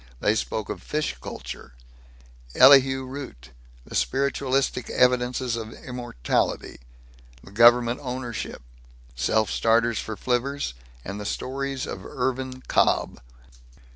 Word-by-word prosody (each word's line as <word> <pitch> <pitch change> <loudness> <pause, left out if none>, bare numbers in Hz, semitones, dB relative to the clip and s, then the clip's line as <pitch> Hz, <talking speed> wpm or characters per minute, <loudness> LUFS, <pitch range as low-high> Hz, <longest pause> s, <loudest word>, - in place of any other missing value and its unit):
They 105 - +2
spoke 110 0 -3
of - - -5
fish 150 - -2
culture, 65 0 -8 0.8
Elihu 135 -1 +7
Root, 130 - -9 0.3
the - - -12
spiritualistic 135 -2 0
evidences 125 -1 +2
of 115 -1 -6
immortality, 120 - -2 0.7
government 120 +2 +5
ownership, 125 - -5 0.5
self 110 - +1
starters 115 0 +2
for 110 -1 -5
flivvers, 130 - -1 0.3
and 100 +2 -5
the - - -6
stories 135 +2 -3
of 95 - -7
Irvin 130 +1 -3
Cobb. - - +1
125 Hz, 105 wpm, -25 LUFS, 110-130 Hz, 0.8 s, Elihu